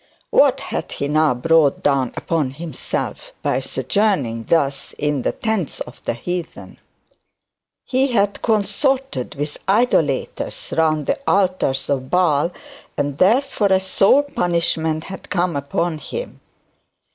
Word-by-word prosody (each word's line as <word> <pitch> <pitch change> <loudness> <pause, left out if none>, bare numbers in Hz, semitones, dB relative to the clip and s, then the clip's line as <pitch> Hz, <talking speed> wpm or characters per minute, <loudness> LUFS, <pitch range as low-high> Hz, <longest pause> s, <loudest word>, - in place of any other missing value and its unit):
What - - +4
had - - -4
he 140 - -2
now 155 -2 +3
brought 155 +2 +3
down 135 -4 +2
upon 160 -5 0
himself 170 - -5
by - - +1
sojourning 140 - 0
thus 140 -4 0
in 150 -2 -1
the - - 0
tents 220 -9 -2
of 120 - -8
the - - -1
heathen? 175 +6 -6 1.1
He 265 +1 +2
had 205 -5 +1
consorted 220 - 0
with 145 +1 -4
idolaters 195 - 0
round 155 -2 +2
the - - 0
altars 185 -9 +1
of 130 -2 -1
Baal; 170 -4 +3 0.5
and 145 -1 -2
therefore 225 +2 +3
a 190 - +5
sore 195 +8 +4
punishment 165 - -1
had 190 +2 -9
come 175 -3 0
upon 155 +3 -1
him. 480 - -6
165 Hz, 125 wpm, -20 LUFS, 145-200 Hz, 1.1 s, a